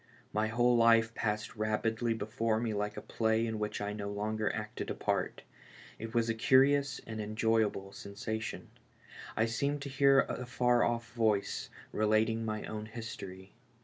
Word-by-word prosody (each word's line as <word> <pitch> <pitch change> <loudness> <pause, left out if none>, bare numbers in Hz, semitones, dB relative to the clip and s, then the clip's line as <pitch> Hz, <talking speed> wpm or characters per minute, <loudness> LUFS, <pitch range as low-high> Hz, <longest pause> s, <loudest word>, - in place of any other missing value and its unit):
My 105 +1 +1
whole 120 +2 +3
life 115 -1 +5
passed 105 -1 -2
rapidly 115 +2 0
before 110 +1 -1
me 115 -2 -1
like 105 +1 -2
a - - -5
play 110 0 +1
in 110 -1 -3
which 105 0 -2
I 105 0 -2
no 100 -1 -4
longer 105 +1 -1
acted 105 -1 -5
a - - -2
part; - - -1 0.6
it 115 0 -5
was 115 -1 +3
a 115 - +1
curious 135 +4 +4
and 110 -1 -5
enjoyable 110 -2 0
sensation 110 +2 -5 0.3
— - - -14
I 110 - +4
seemed 140 +5 -1
to 140 - -5
hear 135 0 +5
a 125 - -4
far 125 -1 +3
off' 115 -2 -1
voice 110 -4 0 0.2
relating 110 +1 +2
my 110 -1 -3
own 110 0 -5
history. 95 -4 -8
110 Hz, 165 wpm, -32 LUFS, 105-115 Hz, 0.6 s, life